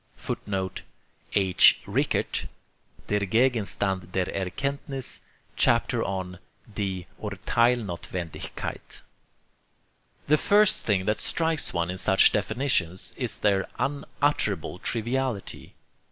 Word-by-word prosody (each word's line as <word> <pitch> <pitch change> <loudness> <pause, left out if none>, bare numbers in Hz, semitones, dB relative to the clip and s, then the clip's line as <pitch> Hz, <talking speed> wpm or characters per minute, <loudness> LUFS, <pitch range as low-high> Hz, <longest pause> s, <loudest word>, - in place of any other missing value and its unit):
[Footnote: 95 -2 -4 0.5
H. 95 -3 +6
Rickert, - - 0 0.6
Der 105 - +1
Gegenstand 100 -4 +1
der 95 -1 +1
Erkenntniss, 135 - -3 0.3
chapter - - +2
on 95 -2 -4 0.3
'Die 95 -4 -3 0.2
Urtheilsnothwendigkeit.'] 100 -5 -2 1.2
The 150 +1 +4
first 210 0 +4
thing 95 -3 +1
that 105 +1 +1
strikes 160 -2 0
one 85 0 -1
in 95 - -4
such 95 0 +5
definitions 105 -5 -1
is - - -3
their 100 -2 +2
unutterable 135 - -1
triviality. 120 -1 -2
100 Hz, 90 wpm, -26 LUFS, 95-130 Hz, 1.2 s, H